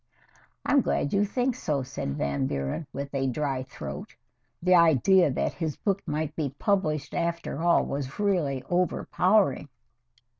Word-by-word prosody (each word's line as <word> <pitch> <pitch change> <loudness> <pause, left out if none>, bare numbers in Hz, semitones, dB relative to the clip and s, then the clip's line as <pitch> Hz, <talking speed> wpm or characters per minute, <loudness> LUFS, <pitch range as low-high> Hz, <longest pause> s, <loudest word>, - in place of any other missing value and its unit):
"I - - 0
am 285 -1 +5
glad 145 - -1
you 200 +1 +3
think 250 +5 0
so," 150 - -1
said 125 - -4
Van 70 -2 0
Buren, 70 - -3
with 140 +1 -6
a 135 -1 0
dry 135 0 -1
throat 70 - -8 0.4
the 180 +2 +3
idea 170 +1 +5
that 130 - -1
his 160 -4 -3
book 200 -1 -1
might 155 0 -2
be 145 -4 -3
published 155 -8 0
after 170 -2 -2
all 170 0 +4
was 140 -1 -4
really 165 -11 0
overpowering. 180 -3 +1
150 Hz, 150 wpm, -27 LUFS, 135-180 Hz, 0.4 s, am